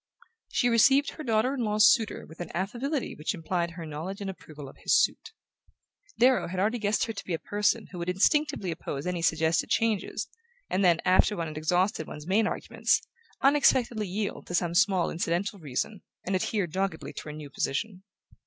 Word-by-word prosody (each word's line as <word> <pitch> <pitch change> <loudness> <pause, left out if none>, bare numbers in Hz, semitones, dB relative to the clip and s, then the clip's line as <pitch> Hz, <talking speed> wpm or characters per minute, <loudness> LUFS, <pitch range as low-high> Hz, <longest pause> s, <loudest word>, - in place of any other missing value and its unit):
She 245 - +2
received 270 +5 +4
her 310 - -8
daughter 230 +2 +1
in 275 - -4
law's 215 0 +6
suitor 225 -4 -3
with 160 - -15
an 175 - -5
affability 245 - -2
which 155 +7 -3
implied 170 0 -2
her 165 - -6
knowledge 160 +6 -6
and 195 -1 -3
approval 150 -6 -11
of 135 - -13
his - - +3
suit. - - 0 0.9
Darrow 255 +2 +4
had 180 +2 -4
already 220 +5 +1
guessed 210 0 +1
her 225 - -2
to 200 - -7
be 175 - -2
a - - -3
person 210 +5 0
who 180 - -7
would 170 +1 -3
instinctively 215 - +1
oppose 145 -3 -5
any 180 -1 -2
suggested 160 0 +1
changes, 225 -3 0 0.4
and 190 - +1
then, 170 -2 +4
after 185 +2 +4
one 165 - -2
had 155 - -9
exhausted 175 +2 +1
one's 150 0 -8
main 210 +5 +2
arguments, - - 0 0.4
unexpectedly 250 -6 +3
yield 200 +3 -4
to 175 - -3
some 175 -1 +1
small 190 -1 +3
incidental 175 +5 -1
reason, 155 +6 -3 0.2
and 190 - 0
adhere 195 +1 0
doggedly 185 0 -3
to - - -8
her 150 - -6
new 150 -2 -9
position. 185 +9 -2
190 Hz, 190 wpm, -28 LUFS, 170-220 Hz, 0.9 s, law's